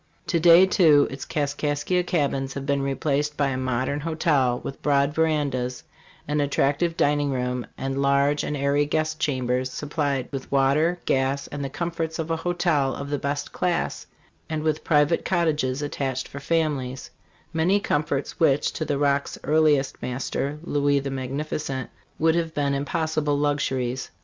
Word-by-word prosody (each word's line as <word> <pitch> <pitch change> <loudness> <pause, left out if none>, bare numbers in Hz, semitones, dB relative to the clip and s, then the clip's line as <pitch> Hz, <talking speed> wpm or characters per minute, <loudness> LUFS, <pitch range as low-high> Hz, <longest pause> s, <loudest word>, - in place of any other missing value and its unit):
To 170 - +1
day, 170 +2 +8
too, 160 -7 +5
its 135 0 -6
Kaskaskia 145 +3 0
cabins 140 -6 -1
have 140 -1 -4
been 140 -1 +1
replaced 145 +2 -1
by 140 -2 +2
a 130 - -2
modern 130 +2 -1
hotel, 150 -5 +1
with 135 - -7
broad 140 0 +2
verandas, 145 -6 0 0.4
an 150 0 +1
attractive 145 +4 +1
dining 145 0 +2
room, 125 -2 -2
and 135 +1 -2
large 140 +1 +2
and 150 - -2
airy 140 +1 +1
guest 155 +1 -1
chambers, 130 -2 0
supplied 140 -2 -2
with 135 -2 -6
water, 140 +6 +3
gas, 135 +1 +1
and 145 0 -5
the 135 - -3
comforts 165 +1 -3
of 160 0 -3
a 165 - +1
hotel 160 -5 0
of 140 +1 -6
the 145 - 0
best 145 +1 -3
class, 180 -1 -1 0.4
and 155 -1 -2
with 155 0 0
private 150 +1 +3
cottages 150 -6 0
attached 135 -3 -3
for 140 - -8
families, 140 -4 -1 0.4
many 175 +5 +3
comforts 145 -6 -2
which, 145 -3 +3
to 160 - -3
the 145 -2 -1
Rock's 140 0 0
earliest 150 -3 +2
master, 135 +3 -3
Louis 145 -3 +1
the 135 0 -4
Magnificent, 135 0 -4 0.3
would 160 +1 +3
have 165 -1 -1
been 140 -1 +1
impos 155 +3 -1
sible 145 -1 +1
luxuries. 130 -3 -1
145 Hz, 160 wpm, -24 LUFS, 135-155 Hz, 0.4 s, day